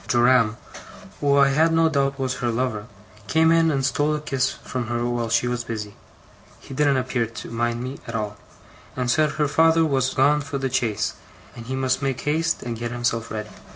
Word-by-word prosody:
Joram, 120 Hz, -2 st, +3 dB, 0.6 s
who 140 Hz, -1 st, +3 dB
I 140 Hz, -1 st, +6 dB
had 160 Hz, +4 st, +3 dB
no 165 Hz, 0 st, +4 dB
doubt 140 Hz, -3 st, 0 dB
was 130 Hz, -2 st, -2 dB
her 125 Hz, -2 st, -1 dB
lover, 115 Hz, -3 st, -2 dB, 0.4 s
came 160 Hz, 0 st, +4 dB
in 165 Hz, 0 st, +4 dB
and 135 Hz, -3 st, 0 dB
stole 145 Hz, +2 st, +1 dB
a -, -, -2 dB
kiss 135 Hz, -3 st, 0 dB
from 125 Hz, -3 st, -5 dB
her 120 Hz, 0 st, -1 dB
while 120 Hz, -1 st, -1 dB
she 115 Hz, +2 st, +2 dB
was 120 Hz, -1 st, -2 dB
busy 105 Hz, -3 st, -5 dB, 0.7 s
(he -, -, -11 dB
didn't 140 Hz, 0 st, +2 dB
appear 125 Hz, -2 st, -1 dB
to 115 Hz, +1 st, -9 dB
mind 120 Hz, +1 st, -1 dB
me, 130 Hz, +2 st, -6 dB
at 115 Hz, -, -5 dB
all), 105 Hz, -1 st, -3 dB, 0.6 s
and 125 Hz, -1 st, 0 dB
said 155 Hz, +1 st, +2 dB
her 150 Hz, -1 st, +1 dB
father 160 Hz, +3 st, +4 dB
was 135 Hz, -3 st, 0 dB
gone 145 Hz, +3 st, +4 dB
for 140 Hz, 0 st, -4 dB
the 135 Hz, -2 st, -3 dB
chaise, 115 Hz, -6 st, 0 dB, 0.4 s
and 115 Hz, -1 st, -10 dB
he 130 Hz, -, -3 dB
must 130 Hz, +1 st, 0 dB
make 135 Hz, -2 st, -2 dB
haste 160 Hz, +3 st, 0 dB
and 115 Hz, -2 st, -5 dB
get 120 Hz, 0 st, -3 dB
himself 120 Hz, -1 st, -1 dB
ready. 105 Hz, -1 st, -5 dB
130 Hz, 205 wpm, -23 LUFS, 120-145 Hz, 0.7 s, I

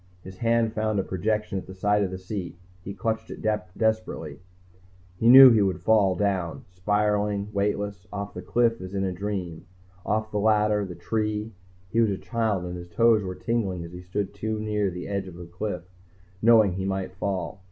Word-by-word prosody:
His 95 Hz, 0 st, -11 dB
hand 115 Hz, -1 st, +2 dB
found 110 Hz, -1 st, -1 dB
a -, -, +1 dB
projection 105 Hz, +2 st, -1 dB
at -, -, -11 dB
the 95 Hz, -, -9 dB
side 105 Hz, +2 st, +2 dB
of 100 Hz, -, 0 dB
the 95 Hz, -, -5 dB
seat. 95 Hz, -2 st, -6 dB, 0.3 s
He 100 Hz, -, -7 dB
clutched 110 Hz, 0 st, -2 dB
it -, -, -8 dB, 0.4 s
desperately. 110 Hz, -9 st, -1 dB, 0.8 s
He 115 Hz, -, +4 dB
knew 130 Hz, +1 st, +11 dB
he 110 Hz, -2 st, +4 dB
would 95 Hz, -2 st, 0 dB
fall, 100 Hz, -3 st, +4 dB
down, 95 Hz, -4 st, -1 dB
spiraling, 105 Hz, +2 st, 0 dB
weightless, 100 Hz, -2 st, -2 dB
off 100 Hz, 0 st, -5 dB
the -, -, -6 dB
cliff 115 Hz, -2 st, +1 dB
as 95 Hz, +1 st, -7 dB
in 95 Hz, -, 0 dB
a 95 Hz, -, -1 dB
dream, 90 Hz, -3 st, -4 dB, 0.4 s
off 110 Hz, +1 st, -1 dB
the 105 Hz, -, -1 dB
ladder, 105 Hz, 0 st, +3 dB
the 90 Hz, -2 st, -8 dB
tree, 105 Hz, +4 st, -2 dB, 0.4 s
he 115 Hz, -, +3 dB
was 110 Hz, -, +3 dB
a 100 Hz, -, -1 dB
child 110 Hz, -6 st, -1 dB
and 90 Hz, 0 st, -5 dB
his 85 Hz, 0 st, -10 dB
toes 115 Hz, +4 st, +4 dB
were 95 Hz, -2 st, -5 dB
tingling 100 Hz, -7 st, -2 dB
as 85 Hz, -, -9 dB
he 90 Hz, -, -8 dB
stood 95 Hz, +2 st, -3 dB
too 110 Hz, +2 st, -3 dB
near 105 Hz, -2 st, 0 dB
the 90 Hz, 0 st, -6 dB
edge 100 Hz, -1 st, -3 dB
of 90 Hz, -, -10 dB
the 90 Hz, 0 st, -9 dB
cliff, 90 Hz, +3 st, -5 dB, 0.6 s
knowing 110 Hz, -4 st, +5 dB
he 95 Hz, +1 st, -3 dB
might 95 Hz, -1 st, -2 dB
fall. 95 Hz, 0 st, -3 dB
100 Hz, 195 wpm, -26 LUFS, 95-110 Hz, 0.8 s, knew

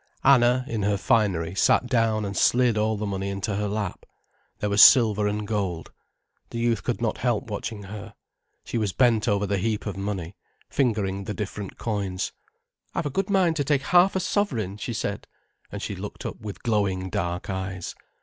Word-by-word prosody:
Anna, 125 Hz, -1 st, +5 dB
in 115 Hz, -7 st, -2 dB
her 100 Hz, 0 st, +1 dB
finery, 95 Hz, -6 st, +1 dB
sat 100 Hz, -, +3 dB
down 115 Hz, -3 st, +1 dB
and 100 Hz, 0 st, -4 dB
slid 120 Hz, -2 st, +3 dB
all 110 Hz, 0 st, +1 dB
the 105 Hz, -, -3 dB
money 100 Hz, -1 st, -3 dB
into 100 Hz, +2 st, -3 dB
her 105 Hz, +1 st, -1 dB
lap. 100 Hz, -2 st, -3 dB, 0.5 s
There 105 Hz, -, -2 dB
was 100 Hz, -, +5 dB
silver 110 Hz, -5 st, +7 dB
and 105 Hz, 0 st, -2 dB
gold. 95 Hz, -6 st, -2 dB, 0.6 s
The -, -, -6 dB
youth 115 Hz, -4 st, 0 dB
could -, -, -2 dB
not -, -, -1 dB
help -, -, -1 dB
watching 110 Hz, -3 st, -4 dB
her. 105 Hz, +1 st, -9 dB, 0.5 s
She 120 Hz, -, -2 dB
was 105 Hz, -4 st, -1 dB
bent 120 Hz, -4 st, +3 dB
over 105 Hz, -2 st, +2 dB
the 100 Hz, -1 st, 0 dB
heap 110 Hz, +2 st, -1 dB
of 100 Hz, -2 st, -4 dB
money, 100 Hz, -3 st, -4 dB, 0.4 s
fingering 100 Hz, -7 st, 0 dB
the 105 Hz, -, -4 dB
different 105 Hz, -1 st, -5 dB
coins. 100 Hz, -5 st, -2 dB, 0.6 s
"I've -, -, -1 dB
a 145 Hz, -, -2 dB
good 195 Hz, +7 st, -1 dB
mind 185 Hz, -5 st, +3 dB
to 145 Hz, -, +1 dB
take 140 Hz, -1 st, +1 dB
half 180 Hz, +4 st, +4 dB
a -, -, +2 dB
sovereign," 120 Hz, -, -1 dB
she 110 Hz, +3 st, -4 dB
said, 105 Hz, -2 st, -3 dB, 0.4 s
and -, -, -6 dB
she -, -, -3 dB
looked -, -, -7 dB
up -, -, -5 dB
with 105 Hz, -2 st, -8 dB
glowing 100 Hz, -5 st, 0 dB
dark 85 Hz, +1 st, -2 dB
eyes. 95 Hz, -1 st, -4 dB
105 Hz, 190 wpm, -25 LUFS, 100-120 Hz, 0.6 s, silver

